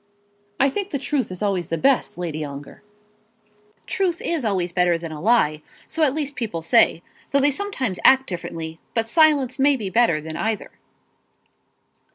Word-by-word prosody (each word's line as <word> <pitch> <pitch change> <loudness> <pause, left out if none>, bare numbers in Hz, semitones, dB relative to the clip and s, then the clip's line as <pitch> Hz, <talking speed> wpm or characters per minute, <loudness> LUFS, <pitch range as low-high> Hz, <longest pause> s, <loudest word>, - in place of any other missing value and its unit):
"I 275 - +5
think 400 +7 -3
the 285 - -1
truth 275 -1 -1
is 185 +3 -4
always 190 -5 -1
the 165 - -2
best, 270 -4 +1
Lady 160 -3 -4
Ongar." 140 -1 -9 1.0
"Truth 370 -2 -1
is 340 - -1
always 185 -5 -1
better 175 -1 +2
than 165 -1 -7
a 150 -1 -7
lie; 180 -9 +2 0.3
so 325 - -4
at 290 -3 +3
least 290 -2 -3
people 210 -10 -4
say, 165 +1 +3 0.3
though 280 - +2
they 285 +1 +3
sometimes 265 - -3
act 265 0 +6
differently; 165 -4 -6 0.2
but 225 -1 +1
silence 280 -1 +3
may 280 +1 +4
be 210 -7 -5
better 225 -9 +3
than 155 +1 -7
either." 220 +3 -3
225 Hz, 170 wpm, -22 LUFS, 170-280 Hz, 1.0 s, act